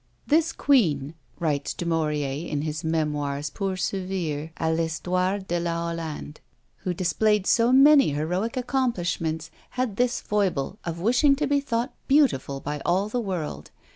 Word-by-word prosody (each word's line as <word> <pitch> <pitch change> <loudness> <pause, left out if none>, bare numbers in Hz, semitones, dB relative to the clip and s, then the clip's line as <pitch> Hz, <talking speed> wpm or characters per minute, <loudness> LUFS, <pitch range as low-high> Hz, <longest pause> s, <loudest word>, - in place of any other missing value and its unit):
"This 325 +2 +3
queen," 160 - +2 0.3
writes 145 -4 -1
Du 175 - -4
Maurier, 150 -2 -1
in 145 -1 -2
his 155 0 -3
Memoires 150 -2 -1
pour 195 -2 -2
servir 180 -5 -3
à 160 0 0
l'Histoire 180 +4 0
de 175 0 0
la 170 -1 -1
Hollande, 160 -2 -6 0.4
"who 185 - -3
displayed 190 +4 +1
so 235 +3 +4
many 275 - +7
heroic 180 - -2
accomplishments, 175 - -1 0.3
had 245 -6 -1
this 245 0 +1
foible, 195 -3 -1
of 170 -1 -4
wishing 250 - +4
to 300 +2 -1
be 285 0 +2
thought 240 -2 -2
beautiful 250 - +2
by 145 +2 -4
all 190 +4 +1
the 245 +2 -1
world. 160 - -4
175 Hz, 145 wpm, -25 LUFS, 155-230 Hz, 0.4 s, many